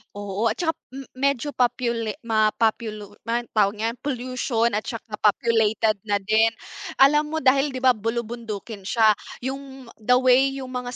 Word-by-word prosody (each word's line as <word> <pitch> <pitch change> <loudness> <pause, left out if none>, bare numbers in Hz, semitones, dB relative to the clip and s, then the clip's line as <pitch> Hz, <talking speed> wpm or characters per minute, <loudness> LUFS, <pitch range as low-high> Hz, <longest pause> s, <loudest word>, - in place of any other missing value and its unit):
Oo, 205 +2 -2
at - - 0
tsaka 335 -3 0 0.2
m 275 - -6
medyo 280 +1 -1
popula 235 -3 0
mapopulu 215 -1 0
ma 235 +1 0
tawag 205 -1 +2
niyan, 225 +3 -3
pollution 250 -3 -1
at 210 - 0
tsaka 225 -3 -6
populated 220 -1 +2
na 205 - +2
din. 220 +2 +3 0.5
Alam 300 +2 +3
mo - - +1
dahil 270 +2 +4
‘di 260 -2 -6
ba 260 - +7
bulubundukin 225 -2 -5
siya, 220 0 +4 0.3
yung 265 -1 -7
the 250 +3 +3
way 260 +2 +4
yung 255 - -9
mga 250 0 -5
235 Hz, 155 wpm, -23 LUFS, 215-255 Hz, 0.5 s, ba